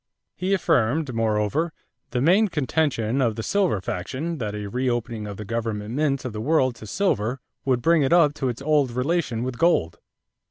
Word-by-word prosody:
He 190 +2 +1
affirmed, 140 - +1
moreover, 115 +8 0 0.4
the 125 - -1
main 190 +9 +4
contention 140 - 0
of 115 -4 +1
the 110 - -4
silver 190 - +1
faction 140 - -4
that 105 -2 -3
a 105 -1 -4
reopening 120 -1 -2
of 100 -2 -7
the 105 - -6
government 110 -1 -3
mints 140 -1 0
of 125 - -4
the 105 - -4
world 130 -1 +2
to 110 - -10
silver 125 - 0 0.3
would 125 -3 +1
bring 165 -1 +4
it 135 - +1
up 165 -4 +5
to 135 -4 -2
its 120 +3 -5
old 150 -3 +3
relation 125 -1 -1
with 125 -2 -4
gold. 125 - +2
125 Hz, 185 wpm, -24 LUFS, 110-155 Hz, 0.4 s, up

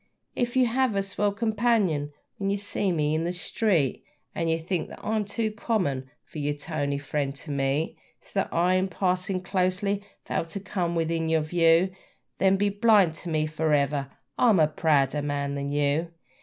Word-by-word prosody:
If 240 0 -1
you 260 -1 +5
have 245 -1 +1
a 195 - +1
swell 205 +1 0
companion 210 -8 +1 0.3
when 195 -1 -1
you 200 - +1
see 200 -1 -1
me 155 -2 +1
on 160 - 0
the 170 - -1
street, 180 - 0 0.3
And 165 -1 -1
you 165 - +2
think 165 0 -3
that - - -10
I'm 215 -1 0
too 215 +2 -1
common 185 - -1
for 155 - -9
your 145 0 -1
toney 145 -1 -2
friend 140 -1 -2
to 145 +1 -7
meet, 140 +3 -1 0.2
So - - -18
that - - -1
I, 175 +2 +2
in 185 +1 +2
passing 185 0 -1
closely, 190 +2 0 0.2
fail - - -1
to 165 +4 -5
come 180 -3 -2
within 165 0 0
your 160 -1 +3
view 165 +3 +3 0.5
Then 195 0 +4
be 205 +1 +2
blind 200 -4 +4
to 175 - -7
me 155 -1 +1
for 155 0 0
ever: 140 -1 +1 0.3
I'm 225 -7 +5
a 155 - +5
prouder 150 -2 +2
man 140 -1 -2
than 140 0 -3
you! 145 +3 +1
170 Hz, 185 wpm, -26 LUFS, 150-200 Hz, 0.5 s, you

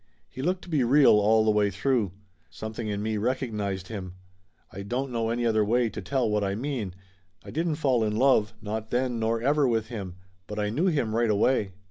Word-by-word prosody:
He 130 - -7
looked 180 +5 -1
to - - -12
be 150 -6 +2
real 135 +3 +6
all 110 +1 +4
the 110 - +4
way 105 -1 +2
through. 100 -1 0 0.4
Something 110 +7 -6
in 105 0 -2
me 110 0 -1
recognized 105 -5 -2
him. 95 -5 -6 0.6
I 100 - -7
don't 125 +6 -3
know 115 -1 -1
any 120 +1 -1
other 110 -2 +3
way 120 +2 +2
to 105 +1 -6
tell 135 -4 0
what 105 -1 0
I 100 0 -1
mean. 115 -6 -3 0.5
I - - -8
didn't 165 0 -1
fall 130 -6 +1
in 105 -1 -1
love, 110 -3 +3
not 110 +1 -4
then 125 -1 0
nor 115 +1 0
ever, 145 +1 +3
with 115 -2 0
him. 100 -7 -6 0.3
But 105 - -6
I 105 0 -1
knew 160 - +1
him 135 -11 0
right 115 -1 +2
away. 105 -1 +2
110 Hz, 210 wpm, -27 LUFS, 105-130 Hz, 0.6 s, real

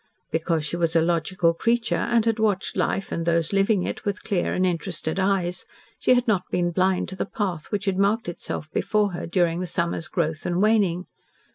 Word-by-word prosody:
Because 160 -1 0
she 155 - -3
was 165 -1 0
a - - +6
logical 170 +1 +1
creature, 230 +6 +1
and 235 -2 +1
had 225 -1 +1
watched 205 -3 0
life 195 - -1
and 165 - -2
those 170 +1 +1
living 195 -1 +3
it - - -4
with 205 -1 -3
clear 190 -4 0
and 185 - +1
interested 175 -1 -2
eyes, 190 -2 0 0.4
she 255 - +4
had 245 0 +1
not 205 -5 +3
been 175 -1 0
blind 185 +1 +1
to 190 - -6
the - - -1
path 185 -9 -3
which 205 -1 -1
had 195 -1 0
marked 205 +3 +2
itself 170 -2 -5
before 210 -2 +1
her 175 - -5
during 170 -1 +1
the 180 - -3
summer's 170 0 -2
growth 160 -2 -2
and 175 0 -1
waning. 200 -4 +2
185 Hz, 205 wpm, -24 LUFS, 170-205 Hz, 0.4 s, a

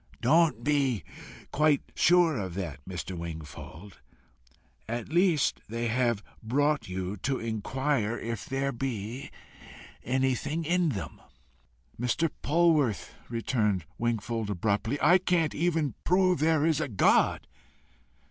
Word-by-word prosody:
"Don't 160 +6 +3
be 135 - +1 0.5
quite 150 -1 +3
sure 175 -2 +4
of 95 -6 -4
that, 80 -7 -5
Mr. 95 0 -5
Wingfold. 85 +3 -8 0.9
At 120 +1 -4
least, 175 -4 +2
they 115 +1 -2
have 120 -3 +1 0.2
brought 145 +3 0
you 95 +2 -4
to 130 +7 -1
inquire 115 +1 -1
if 115 -2 -5
there 135 +1 -1
be 120 -1 -4 0.7
anything 130 +5 0
in 175 +1 +2
them." 105 -9 -5 0.8
"Mr. 145 +7 0
Polwarth," 150 - +2 0.2
returned 110 -6 0
Wingfold 115 -1 -1
abruptly, 105 +6 0
"I 180 +2 +5
cannot 175 -4 +1
even 160 -3 0
prove 185 -1 +3
there 155 0 +3
is 160 -2 +2
a 145 - -2
God!" 100 - +3
125 Hz, 115 wpm, -28 LUFS, 105-155 Hz, 0.9 s, I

